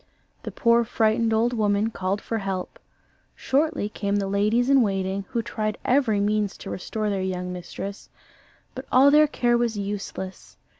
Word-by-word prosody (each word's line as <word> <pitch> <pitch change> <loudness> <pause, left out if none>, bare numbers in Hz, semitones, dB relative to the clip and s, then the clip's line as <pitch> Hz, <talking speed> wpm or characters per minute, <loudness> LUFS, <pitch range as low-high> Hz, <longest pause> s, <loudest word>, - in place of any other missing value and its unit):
The - - -6
poor 235 0 +3
frightened 225 0 +1
old 230 +2 +2
woman 210 -1 +1
called 195 0 -2
for 225 - -2
help; 195 - -4 0.6
shortly 295 -4 0
came 200 -1 -2
the 200 -1 0
ladies 210 +5 +1
in 275 -1 +5
waiting, 195 -2 -1
who 235 -3 -2
tried 215 -1 -3
every 245 -6 +2
means 205 0 0
to - - -8
restore 210 +3 -3
their 195 -1 -1
young 180 -1 -3
mistress, 195 +3 -7 0.6
but - - -8
all 270 +2 +6
their 305 +1 +6
care 240 -4 +1
was 235 -3 0
useless. 200 -2 -6
215 Hz, 160 wpm, -24 LUFS, 200-235 Hz, 0.6 s, all